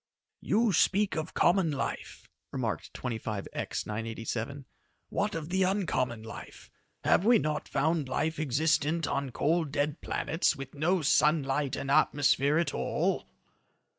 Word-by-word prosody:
"You 220 -1 +2
speak 200 +3 +3
of 160 0 -4
common 175 -1 +3
life," 140 -2 -4 0.2
remarked - - -3
25X 110 -4 -4
987. 115 +5 -4 0.4
"What - - -1
of 160 -1 -4
the 190 +1 +1
uncommon 140 - 0
life? 110 - -10 0.3
Have - - +4
we 235 +2 +6
not 155 -6 -2
found 150 0 0
life 155 +3 -1
existent 155 +2 +1
on 140 -1 -1
cold, 155 +4 0
dead 145 +2 -1
planets 165 - 0
with 135 -1 -8
no 160 +4 +1
sunlight 145 -2 +2
and 135 - -3
atmosphere 145 0 +3
at 165 -4 0
all?" - - -1
150 Hz, 130 wpm, -29 LUFS, 135-165 Hz, 0.4 s, we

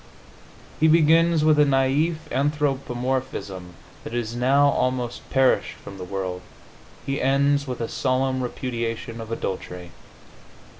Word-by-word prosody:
He 160 - +5
begins 165 0 +4
with 155 -1 +4
a - - +7
naif 140 +4 +2 0.2
anthropomorphism 130 - -2 0.3
that 115 - -6
is 120 -1 -3
now 135 +4 +4
almost 125 -3 -2
perished 135 -1 +2
from 100 -1 -11
the - - -5
world; 90 -1 -4 0.6
he 135 0 -2
ends 140 +1 +2
with 125 -2 -4
a 115 - -1
solemn 130 +1 0
repudiation 115 -2 -4
of 110 0 -8
adultery.... 90 -5 -5
130 Hz, 120 wpm, -24 LUFS, 115-140 Hz, 0.6 s, a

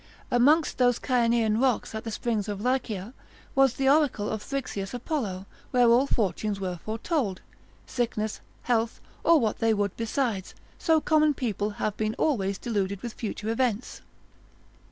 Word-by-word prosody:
Amongst 290 +7 +3
those 245 -1 +4
Cyanean 230 -3 +2
rocks 255 -5 +1
at 220 +1 -5
the - - -3
springs 220 -1 -2
of 205 -2 -3
Lycia, 230 -3 -1 0.4
was 270 -2 +4
the 270 - 0
oracle 280 -7 +3
of 220 - -3
Thrixeus 250 -6 -4
Apollo, 225 - -3 0.2
where 245 -1 +4
all 245 +4 +5
fortunes 205 -3 -1
were 180 -3 -3
foretold, 220 - -2 0.4
sickness, 220 -3 -2 0.2
health, 230 -2 0 0.2
or 335 -2 +6
what 220 -5 -1
they 225 -1 +3
would 200 -2 -1
besides: 230 -4 -2 0.2
so 320 -1 +3
common 305 -1 +3
people 210 -5 -1
have 210 -1 -1
been 215 +1 -1
always 200 -10 0
deluded 200 -4 -2
with 235 -2 -4
future 220 -1 -4
events. 230 -1 -1
230 Hz, 150 wpm, -27 LUFS, 210-255 Hz, 0.4 s, or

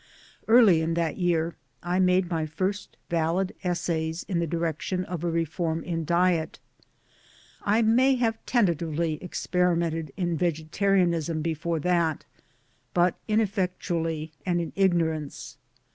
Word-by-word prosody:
Early 220 -8 +6
in 165 +1 -1
that 165 -2 -1
year 170 -2 +1 0.3
I 175 +1 0
made 180 0 +3
my 160 -2 -1
first 190 +6 -3
Valid 170 +3 0
essays 170 -2 -1
in 180 -4 -2
the 170 - 0
direction 170 +3 -2
of 175 -2 -5
a 175 - 0
reform 165 0 -1
in 165 -2 -3
diet. 170 -1 +1 1.0
I 215 +3 +2
may 255 +5 +4
have 225 -3 -1
tentatively 170 - 0
experimented 170 -4 0
in 175 -3 -1
vegetarianism 170 0 +1
before 165 0 -1
that, 170 -2 +1 0.7
but 175 0 +4
ineffectually 180 -7 -1
and 175 -2 0
in 170 - -4
ignorance. 165 -6 0
170 Hz, 120 wpm, -26 LUFS, 160-185 Hz, 1.0 s, Early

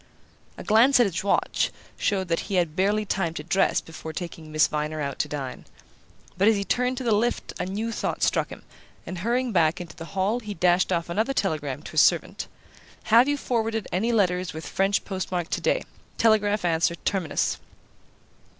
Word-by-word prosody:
A - - -7
glance 235 +5 +5
at 240 - +6
his 185 -2 -2
watch 200 - +1 0.3
showed 190 -3 0
that 165 - +1
he 200 - -1
had 170 -4 +1
barely 205 +3 +1
time 175 -5 -1
to 150 - -5
dress 190 +4 +2
before 160 0 -9
taking 165 -3 -7
Miss 155 0 +4
Viner 150 +1 -2
out 140 -2 -3
to - - +1
dine; 135 -3 -5 0.8
but 200 - +4
as 225 - +5
he 200 - -1
turned 250 +4 0
to 260 - -3
the 235 - +1
lift 230 +4 0
a - - -2
new 215 +4 -3
thought - - -2
struck - - +1
him, - - -10 0.4
and 185 - -6
hurrying 240 +5 0
back 170 -2 +2
into 170 -3 -8
the 165 - -8
hall 205 +6 +1
he 210 -3 -7
dashed 180 +2 +3
off 170 -2 0
another 220 +10 0
telegram 150 - -2
to - - -9
his - - +4
servant: - - +2 0.7
"Have 240 +3 +8
you 290 0 +1
forwarded 225 -5 -1
any 215 +7 +1
letter 185 -5 +2
with 160 - -6
French 195 +1 0
postmark 185 -3 -3
today? - - +1 0.3
Telegraph 210 -3 +3
answer 170 0 +2
Terminus." 185 -1 -1
190 Hz, 185 wpm, -25 LUFS, 165-220 Hz, 0.8 s, Have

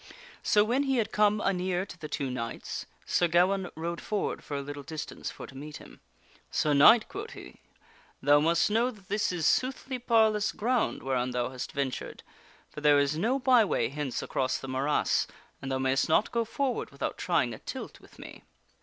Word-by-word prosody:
So, 210 -1 +4
when 240 +6 +1
he 270 -1 +1
had 225 -3 0
come 210 0 +3
anear 185 -1 0
to 200 - -10
the 160 -3 -8
two 140 -4 -3
knights, 115 -2 -5 0.2
Sir 175 - +2
Gawaine 180 +2 +2
rode 170 +1 -4
forward 210 -2 -2
for 145 - -4
a - - -2
little 145 +1 -7
distance 155 +1 -6
for - - -9
to - - -13
meet 150 +2 -8
him. - - -14 0.3
" - - -29
Sir 150 - +1
Knight," 215 +11 +7
quoth 435 +4 -7
he, - - -11 0.3
" - - -30
thou 145 0 +6
must 165 +6 +2
know 230 +3 +3
that 205 -6 -14
this 205 0 +1
is 170 -4 -2
soothly 260 0 0
parlous 220 -3 +3
ground 240 +2 0
whereon 130 -1 0
thou 125 -1 -1
hast 130 -1 -6
ventured; 140 -2 -4 0.4
for 150 - -10
there 150 -1 +5
is 140 +1 +2
no 230 - +1
byway 235 - +3
hence 140 -2 -3
across 130 -1 -1
the 135 - -8
morass, 135 +3 +1 0.3
and 135 - -5
thou 130 - +1
mayst 130 +3 +1
not 160 - +3
go 235 -1 0
forward 260 +3 -2
without - - -4
trying - - +1
a - - -9
tilt - - -7
with - - -19
me." - - -11
170 Hz, 200 wpm, -29 LUFS, 140-220 Hz, 0.4 s, Knight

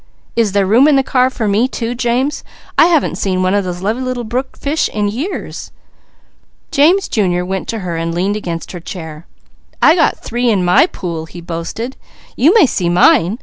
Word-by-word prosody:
"Is 225 -4 +1
there 200 -1 +2
room 235 +9 +5
in 300 - +4
the 270 - +3
car 255 -1 +2
for 230 -4 -3
me 210 +5 +2
too, 240 -2 -4
James? 250 +3 -1 0.3
I - - +6
haven't 330 -4 +1
seen 185 -2 0
one 185 +1 +1
of 205 -1 +1
those 180 0 -5
little 245 +4 -2
brook 250 +4 -4
fish 295 +3 -1
in 210 -1 -1
years!" 275 - -5 1.0
James 335 +6 +3
Jr. 180 -5 0
went 190 +1 -4
to 230 - -3
her 170 -2 -3
and 165 0 -2
leaned 185 +4 -1
against 170 -5 -5
her 180 - -7
chair. 160 -2 -9 0.5
"I 315 - +6
got 330 -2 +2
three 240 +1 -2
in 195 -5 +1
my 180 - +5
pool. 170 - -6
You 180 - -3
may 435 - +7
see 180 -9 -1
mine! 175 +3 +4
215 Hz, 185 wpm, -16 LUFS, 180-255 Hz, 1.0 s, may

